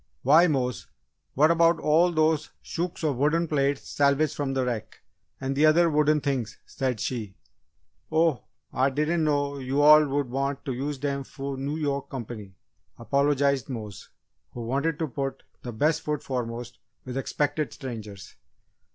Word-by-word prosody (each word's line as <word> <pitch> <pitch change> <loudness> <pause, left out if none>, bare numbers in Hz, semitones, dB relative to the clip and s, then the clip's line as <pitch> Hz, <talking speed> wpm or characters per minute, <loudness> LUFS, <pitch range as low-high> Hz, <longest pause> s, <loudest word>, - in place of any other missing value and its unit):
"Why, 155 +7 +6
Mose! 125 -5 -1 0.5
What 155 +4 +5
about 165 0 +4
all 165 +4 +3
those 155 -1 +1
shooks 170 0 -4
of 145 -5 0
wooden 155 +5 +2
plates 140 -2 0
salvaged 145 +1 +2
from 135 -2 -2
the 130 -1 +1
wreck 120 -3 -4 0.4
and 135 0 -2
the 150 +3 +5
other 165 +2 +4
wooden 150 0 +3
things?" 135 -5 -2
said 130 -5 -2
she. 105 -5 -4 0.8
"Oh, 160 -6 +2 0.3
Ah 130 +2 +2
diden' 150 +4 0
know 145 -2 0
yo' 135 +2 0
all 150 0 +7
woul' 140 +1 0
want 135 +2 -3
t' 135 - -2
use 140 +3 -3
dem 140 0 -2
fo' 135 +1 -6
Noo 140 +3 -3
Yoak 140 -3 -2
comp'ny," 110 -6 -7 0.4
apologised 140 +3 +1
Mose, 110 -6 -7 0.4
who 120 - -6
wanted 140 +7 -1
to 160 - -1
put 135 0 -4 0.2
"the 120 - -6
best 150 +8 +1
foot 150 -1 -3
foremost" 120 -2 -5 0.3
with 125 -1 -6
expected 145 +3 -1
strangers. 110 -7 -8
140 Hz, 155 wpm, -26 LUFS, 130-150 Hz, 0.8 s, all